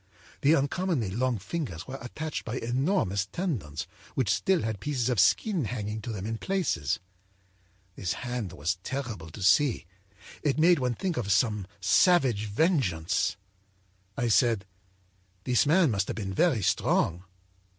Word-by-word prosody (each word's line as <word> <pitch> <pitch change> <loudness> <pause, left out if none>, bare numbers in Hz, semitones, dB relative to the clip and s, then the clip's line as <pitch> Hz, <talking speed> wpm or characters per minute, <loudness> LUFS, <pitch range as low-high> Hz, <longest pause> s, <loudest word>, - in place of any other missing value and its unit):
The 155 +2 +5
uncommonly 145 - 0
long 125 +3 0
fingers 100 - -5
were 135 +1 -6
attached 150 +6 -5
by 115 +2 -4
enormous 120 - 0
tendons 95 - -3 0.3
which 125 -7 +2
still 190 -4 +1
had 110 -2 -2
pieces 130 -3 -1
of 120 -5 +1
skin 180 - +3
hanging 110 -1 -4
to 115 - -5
them 100 -3 -5
in 110 0 -3
places. 115 - 0 1.0
This 90 -2 -2
hand 120 -6 -4
was 85 +5 -2
terrible 115 -9 -5
to 95 +5 -8
see; 130 - +3 0.6
it 145 -2 0
made 170 +1 +5
one 125 -2 0
think 180 - -2
of 100 -4 -1
some 105 -2 +2
savage 120 - +4
vengeance. 100 - +1 0.8
âI 120 -1 +1
said: 115 -4 +3 0.8
â'This 125 +2 +3
man 165 -2 +4
must 100 -2 0
have - - -3
been 95 -3 -4
very 145 - +2
strong.' 85 -1 +1
120 Hz, 145 wpm, -28 LUFS, 100-145 Hz, 1.0 s, The